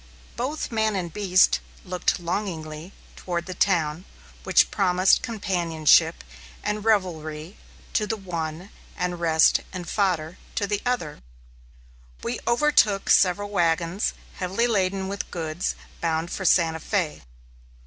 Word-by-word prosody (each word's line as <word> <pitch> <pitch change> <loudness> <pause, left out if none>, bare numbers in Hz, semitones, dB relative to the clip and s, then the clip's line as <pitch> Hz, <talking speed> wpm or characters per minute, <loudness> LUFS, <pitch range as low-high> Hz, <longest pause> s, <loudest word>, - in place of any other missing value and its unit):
Both 270 +5 -3
man 220 -2 +1
and 175 -4 -3
beast 185 -3 +4 0.3
looked 180 +1 0
longingly 170 -2 -4 0.2
toward 175 -1 -3
the 185 - -5
town, 175 -3 +1 0.4
which - - +4
promised 185 -1 +3
companionship 170 -7 +2 0.4
and 210 0 -2
revelry 170 -5 -1 0.4
to 210 - +1
the 220 - -2
one, 170 -2 -5 0.3
and 180 -1 -2
rest 160 -2 +4
and 180 -2 -6
fodder 180 -5 -1 0.2
to 200 - 0
the 205 0 -2
other. 235 -12 -2 1.0
We - - -2
overtook 235 -6 +3
similar 190 +2 +4
wagons, 175 -1 0 0.2
heavily 190 +6 0
laden 195 -4 0
with 200 0 -4
goods 165 0 -3 0.3
bound 165 0 -1
for 190 - -4
Santa 165 -3 +3
Fé. 175 -3 -2
180 Hz, 120 wpm, -25 LUFS, 165-205 Hz, 1.0 s, beast